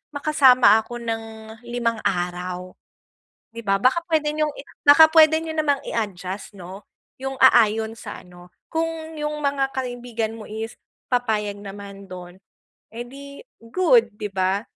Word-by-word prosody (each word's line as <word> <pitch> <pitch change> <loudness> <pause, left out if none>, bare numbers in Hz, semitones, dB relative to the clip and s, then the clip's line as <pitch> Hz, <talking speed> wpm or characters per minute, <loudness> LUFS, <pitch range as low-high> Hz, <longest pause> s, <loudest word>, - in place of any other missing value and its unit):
makasama 265 -6 +5
ako 240 +2 -7
ng 225 -1 -3 0.4
limang 235 -2 -1
araw." 180 0 -3 0.8
'Di 230 - -8
ba? 195 0 +2
Baka 255 +8 +3
pwede 305 -2 +2
niyong 305 -1 0
i - - -9 0.2
baka 315 +2 +9
pwede 315 -1 +7
niyo 325 - -5
namang 290 -3 +1
i-adjust 195 -2 -4
'no, 190 +2 -10 0.4
yung 270 0 -4
aayon 220 -3 +5
sa - - -8
ano. 180 0 -16 0.2
Kung 325 -1 -3
yung 300 0 -2
mga 275 -1 0
kaibigan 245 -3 -4
mo 215 - -9
is 220 +2 -6 0.4
papayag 215 -5 -1
naman 200 0 -10
do'n, 180 0 -10 0.6
eh, 240 +1 -5
'di 280 +2 -11 0.3
good, 255 -8 +4
'di 210 - -3
ba? 190 +1 0
230 Hz, 140 wpm, -22 LUFS, 200-280 Hz, 0.8 s, baka